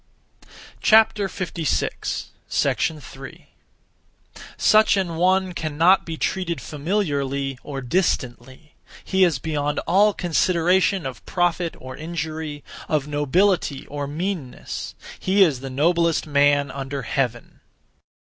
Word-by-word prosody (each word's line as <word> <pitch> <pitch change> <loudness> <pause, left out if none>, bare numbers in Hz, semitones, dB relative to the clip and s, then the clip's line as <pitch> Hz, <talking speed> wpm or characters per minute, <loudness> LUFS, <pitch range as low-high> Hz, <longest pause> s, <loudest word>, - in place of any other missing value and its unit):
3. 195 -6 +2 2.9
(Such 215 -1 +5
an 175 -4 -1
one) 185 +2 +2
cannot 165 +4 +3
be 165 -1 -4
treated 170 -4 -2
familiarly 140 -4 -2
or 140 -2 -6
distantly; 130 -2 -2 0.3
he 190 0 +2
is 170 -6 +3
beyond 150 +1 -2
all 200 +4 +4
consideration 180 +1 +2
of 130 -4 -6
profit 175 -1 0
or 130 0 -8
injury; 155 -2 -5 0.3
of 150 -2 0
nobility 150 +1 +1
or 145 -1 -5
meanness: 160 -2 -5 0.2
he 195 +1 +4
is 150 -8 +1
the 135 +1 -6
noblest 165 +4 +1
man 145 -1 +3
under 135 0 -5
heaven. 120 -1 -3
160 Hz, 100 wpm, -23 LUFS, 140-185 Hz, 2.9 s, Such